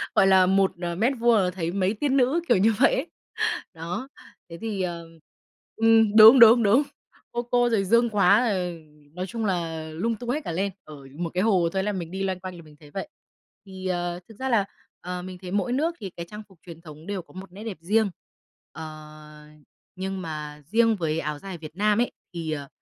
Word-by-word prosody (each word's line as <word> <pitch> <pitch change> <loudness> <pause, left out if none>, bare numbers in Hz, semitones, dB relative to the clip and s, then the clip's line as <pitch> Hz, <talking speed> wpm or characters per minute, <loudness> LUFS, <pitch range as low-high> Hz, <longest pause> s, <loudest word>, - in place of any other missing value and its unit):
gọi 195 - +5
là 190 -1 +6
1, 195 +1 +3
ờ, 170 -1 -2
mét 235 +8 +1
vuông 235 0 +4
là 185 -3 +2
thấy 170 -2 -3
mấy 190 +1 0
tiên 275 +4 0
nữ, 270 +7 +2
kiểu 240 - +4
như 215 +4 +3
vậy 270 - +5
ấy. 275 - -2 0.7
Đó, 170 +10 -5 0.4
thế 170 - -8
thì, 215 -4 -3
ờ 170 -2 -3 0.7
ừm, 225 -1 +4
đúng, 220 +4 +10
đúng, 230 0 +8
đúng, 230 +8 +4 0.5
Cô 240 - -2
Cô 245 0 +2
rồi 220 -4 +1
Dương 235 +3 +3
Quá, 200 +1 +4
ờ, 180 -3 -1 0.4
nói 185 +2 -4
chung 230 0 -4
là 165 -4 -2
lung 190 +9 -2
tung 240 +2 -8
hết 295 +5 0
cả - - -3
lên. 195 +4 -1
Ở 155 - -11 0.2
một 170 -1 -3
cái 180 +1 +1
hồ 185 -6 +3
thôi 190 - 0
là 210 - -1
mình 170 -4 -5
đi 190 +1 -3
loanh 190 -1 -2
quanh 185 0 -7
là - - -11
mình 150 -1 -17
thấy 145 -2 -16
vậy. 200 +10 -5 0.6
Thì, 190 -1 -7
ờ, 175 -1 -2
thực 220 - -13
ra 265 0 -2
là, 220 -5 +3 0.4
ờ, 180 0 -5
mình 185 0 -8
thấy 180 - -7
mỗi 205 +5 0
nước 325 +5 0
thì 195 -3 -6
cái 170 - -5
trang 210 0 -9
phục 185 -4 -21
truyền 170 -2 -11
thống 155 -1 -13
đều 200 -2 -3
có 170 - -21
một 190 0 -10
nét 200 +4 -10
đẹp 215 -7 -6
riêng, 210 +4 +2 0.6
ờ, 155 -1 -11 0.5
nhưng 190 0 -4
mà 150 -3 -6
riêng 225 +6 +3
với 160 -3 -1
áo 150 -1 -4
dài 190 0 -7
Việt 155 -1 -11
Nam 210 +3 +2
ấy, 245 - 0 0.2
thì, 165 -2 -4
ờ, 145 -2 -4
190 Hz, 225 wpm, -25 LUFS, 170-225 Hz, 0.7 s, đúng